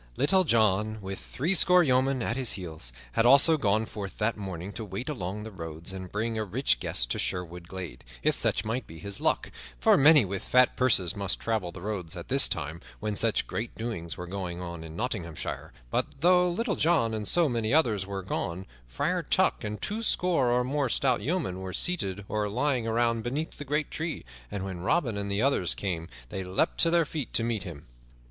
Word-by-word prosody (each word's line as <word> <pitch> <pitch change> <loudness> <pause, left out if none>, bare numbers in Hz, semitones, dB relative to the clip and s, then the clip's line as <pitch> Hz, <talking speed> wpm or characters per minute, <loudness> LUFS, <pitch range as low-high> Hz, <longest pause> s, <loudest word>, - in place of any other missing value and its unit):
Little 185 +7 +4
John, 110 - +2
with 95 -1 -6
threescore 180 +4 +4
yeomen 130 -2 +2
at 115 - -1
his 130 -3 +1
heels, 80 -9 -5 0.2
had 115 - +2
also 140 +6 +8
gone 110 -6 +1
forth 100 -3 -7
that 110 +2 0
morning 95 -1 -6
to 115 - -5
wait 100 +4 -6
along 105 -6 -4
the 110 - -8
roads 80 -1 -7
and 95 -1 -7
bring 110 +2 -2
a - - 0
rich - - +1
guest - - +2
to - - -1
Sherwood 90 -1 -3
glade, 95 -1 -7 0.2
if - - +3
such 95 - +2
might 115 +1 -3
be 80 - -11
his 100 +2 -5
luck, - - +1 0.3
for - - +4
many 150 -3 +7
with 95 0 -4
fat 125 0 +4
purses 105 -9 +2
must 100 -2 -2
travel 110 -6 -2
the 90 - -10
roads 95 -6 -3
at 85 - -8
this 135 +1 +6
time, 80 +2 -4 0.2
when 105 -1 -3
such 115 +1 +2
great 110 +1 -5
doings 110 -8 -4
were 90 - -6
going 90 -1 -5
on 85 -2 -6
in 80 0 -9
Nottinghamshire, 95 - -4 0.2
but - - +1
though 180 +1 +5
Little 205 +4 -1
John 155 -9 +2
and 105 -2 -3
so 170 -2 +4
many 115 -4 -1
others 115 -11 +3
were 95 0 -5
gone, 90 0 -3 0.2
Friar - - -1
Tuck - - +1
and 105 0 -4
twoscore 180 - +1
or 125 +1 +2
more 135 +1 -1
stout 125 -2 +2
yeomen 140 - -2
were 95 -1 -6
seated 100 - +1
or 105 -1 -1
lying 125 +1 0
around 115 0 +1
beneath 135 +8 -4
the 145 - -6
great 150 +2 -1
tree, 160 0 -4 0.2
and 95 -1 -4
when 95 -2 -5
Robin 120 - 0
and 100 0 -3
the 100 +3 0
others 135 -10 +2
came 85 -4 -4 0.2
they 95 - -4
leaped 90 +1 -1
to 165 - +5
their 170 -1 +3
feet 150 -3 -5
to 115 - +3
meet 115 -3 -1
him. 80 -5 -9
110 Hz, 205 wpm, -28 LUFS, 95-130 Hz, 0.3 s, also